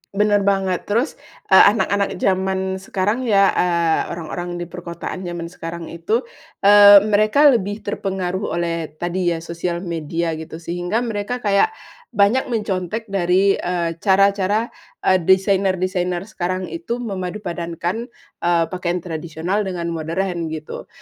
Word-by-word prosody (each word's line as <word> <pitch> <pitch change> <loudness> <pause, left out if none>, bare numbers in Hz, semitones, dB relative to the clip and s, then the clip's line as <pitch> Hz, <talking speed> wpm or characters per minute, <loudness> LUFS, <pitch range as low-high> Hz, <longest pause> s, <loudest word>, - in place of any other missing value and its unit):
Bener 205 0 +3
banget. 195 -2 0
Terus, 230 +8 -1 0.3
eee, - - +9
anak-anak 200 -2 0
zaman 190 0 0 0.2
sekarang 205 +6 -1
ya, 200 -3 +4
eee, 170 -2 +2
orang-orang 175 +1 -5
di 175 - -4
perkotaan 170 0 -7
zaman 170 -1 -5
sekarang 165 -1 -7
itu, 210 +9 -1 0.4
eee, 205 0 +9
mereka 215 +8 +5
lebih 205 -2 -1
terpengaruh 190 -2 -3
oleh 170 -2 -2
tadi 175 0 -1
ya, 165 - -7
sosial 170 +1 -4
media 165 0 -2
gitu, 160 0 -8
sehingga 175 +7 -2
mereka 230 +2 -3
kayak 205 - +2 0.4
banyak 210 +6 +3
mencontek 210 -2 -2
dari, 190 +1 +2
eee, 170 -2 -2
cara-cara, 200 +2 +2 0.3
eee, 185 0 +4
desainer-desainer 185 -2 +1
sekarang 185 -3 -3
itu 245 -8 -4
memadupadankan, 180 0 -4 0.3
eee, 170 -1 +2
pakaian 180 -1 -2
tradisional 170 +4 -3
dengan 170 -2 -3
modern, 170 +1 -2
gitu. 155 -1 -7
185 Hz, 125 wpm, -20 LUFS, 170-205 Hz, 0.4 s, eee